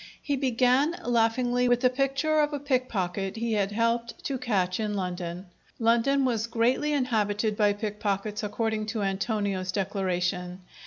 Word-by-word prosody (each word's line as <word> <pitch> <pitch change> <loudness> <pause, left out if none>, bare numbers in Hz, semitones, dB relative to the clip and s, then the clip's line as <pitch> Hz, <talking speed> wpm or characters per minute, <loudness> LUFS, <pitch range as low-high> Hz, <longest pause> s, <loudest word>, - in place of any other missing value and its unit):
He 285 - -1
began, 260 +4 +2
laughingly, 245 +1 +2
with 245 0 +3
the 255 - +5
picture 275 +4 +1
of 295 0 +2
a 290 - -2
pickpocket 210 -9 -1
he 230 0 -1
had 205 -2 +1
helped 230 +2 -1
to 270 -2 -2
catch 195 -7 0
in 210 -1 -1
London. 180 -1 -4 0.3
London 235 +4 +3
was 230 -3 0
greatly 240 +6 +1
inhabited 220 -6 0
by 205 -1 +3
pickpockets, 210 0 -2
according 215 0 -2
to 215 -1 -2
Antonio's 195 -1 -1
declaration. 185 -2 -2
225 Hz, 145 wpm, -27 LUFS, 200-250 Hz, 0.3 s, the